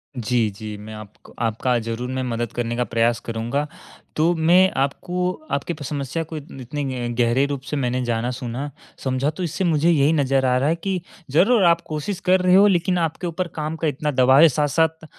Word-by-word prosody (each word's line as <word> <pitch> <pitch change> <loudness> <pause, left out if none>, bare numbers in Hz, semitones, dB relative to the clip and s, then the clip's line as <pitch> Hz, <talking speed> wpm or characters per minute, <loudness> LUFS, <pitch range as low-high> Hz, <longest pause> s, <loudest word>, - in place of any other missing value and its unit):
जी, 120 -2 0
जी 105 +1 -8
मैं 105 +1 -10
आप 105 -1 -10 0.3
आपका 115 +2 0
ज़रूर 115 +2 -4
मैं 130 0 -2
मदद 120 -2 -3
करने 120 -1 -2
का 125 - +1
प्रयास 115 0 +1
करूँगा। 120 +6 -2 0.5
तो 165 +3 +3
मैं 175 +4 +5
आपको 180 +6 -1 0.2
आपकी 140 +5 -1
प 155 - -9
समस्या 140 +2 -3
को 160 - -5
इत 150 0 -9
इतने 145 +4 -4 0.3
ग - - -3
गहरे 120 +3 +3
रूप 140 -2 -4
से 135 +2 -4
मैंने 125 -1 -1
जाना, 120 0 -1
सुना, 130 +3 -5 0.3
समझा 130 +2 0
तो 170 +4 -5
इससे 175 +3 -2
मुझे 165 -2 +2
यही 150 -2 +4
नज़र 135 -3 +2
आ 125 0 +3
रहा 135 +3 +1
है 165 - +2
कि 185 +1 -3 0.3
ज़रूर 200 - +4
आप 170 -1 +4
कोशिश 155 +5 -4
कर 185 +1 +5
रहे 180 0 +4
हो 200 +2 +7
लेकिन 180 -1 +2
आपके 170 +1 -2
ऊपर 175 +2 -3
काम 155 0 -3
का 160 - -1
इतना 150 +1 -1
दबाव 130 +1 +5
है 165 - +8
साथ-साथ 160 +3 0
140 Hz, 210 wpm, -22 LUFS, 120-165 Hz, 0.5 s, है